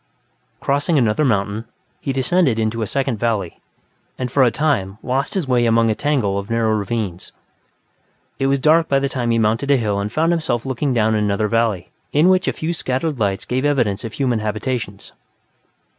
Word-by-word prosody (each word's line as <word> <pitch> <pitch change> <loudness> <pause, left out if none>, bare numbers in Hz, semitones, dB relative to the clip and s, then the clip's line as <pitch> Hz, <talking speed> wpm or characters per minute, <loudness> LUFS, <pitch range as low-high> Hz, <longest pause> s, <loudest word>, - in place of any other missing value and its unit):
Crossing 145 +3 +1
another 120 +2 +2
mountain, 105 -3 0 0.3
he 140 - -3
descended 135 0 +2
into 110 +1 -1
a 110 - -1
second 135 -4 -1
valley, 105 -7 -1 0.6
and, 125 -2 -3
for 140 - +2
a 125 - +6
time, 115 -9 -1
lost 135 +6 -1
his 180 -7 -1
way 120 -2 +2
among 115 0 +3
a - - +2
tangle 115 -7 0
of 100 - -8
narrow 115 -1 +1
ravines. 105 -3 -3 1.1
It 135 - +1
was 140 0 +2
dark 160 +4 +3
by 140 - +3
the 140 0 +1
time 125 -3 -2
he 115 - +2
mounted 115 +5 +1
a 140 - +5
hill 105 -4 -1
and 100 +1 -3
found 160 +6 +1
himself 155 -8 -1
looking 135 +2 -1
down 110 -2 +2
another 105 0 +1
valley, 110 -5 0 0.2
in 155 +5 +4
which 185 -1 +3
a - - +3
few 160 +2 -3
scattered 140 -1 -2
lights 100 -2 -1
gave 130 +2 -1
evidence 125 -9 +1
of 115 -1 -6
human 125 -5 0
habitations. 110 -1 -4
120 Hz, 190 wpm, -20 LUFS, 110-140 Hz, 1.1 s, a